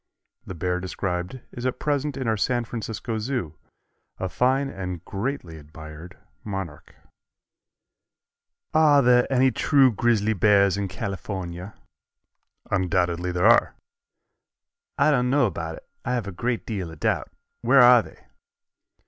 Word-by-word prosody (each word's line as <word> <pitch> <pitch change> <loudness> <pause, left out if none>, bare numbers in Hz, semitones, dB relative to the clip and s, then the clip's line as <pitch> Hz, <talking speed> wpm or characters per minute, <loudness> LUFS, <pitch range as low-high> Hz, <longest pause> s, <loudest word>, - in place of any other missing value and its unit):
The 95 - -6
bear 90 +2 -1
described 90 +4 -4
is 120 - -8
at 130 -1 -1
present 145 -1 -1
in 130 -3 -3
our 110 - +2
San 120 +3 0
Francisco 115 0 -4
Zoo, 110 - -3 0.6
a 95 - -3
fine 130 +8 +1
and 90 -7 -6
greatly 100 - -4
admired 80 +3 -11 0.3
monarch. 95 -7 -6 1.8
"Are 150 -3 +5
there 125 +1 +4
any 130 0 +4
true 135 +2 +4
grizzly 110 -1 +1
bears 100 -1 +4
in 100 -1 -2
California?" 95 -1 -6 1.0
"Undoubtedly 90 -1 0
there 90 +2 0
are." 115 +1 +5 1.2
"I 155 - +4
don't 125 -3 +2
know 140 0 +3
about 80 -5 -4
it. - - -15 0.2
I 125 - -1
have 120 -5 -2
a 100 - -5
great 120 +6 -2
deal 95 -6 -4
of 80 -2 -12
doubt. - - 0 0.3
Where 135 -2 +6
are 120 -1 +8
they?" 80 - -16
105 Hz, 135 wpm, -24 LUFS, 90-125 Hz, 1.8 s, are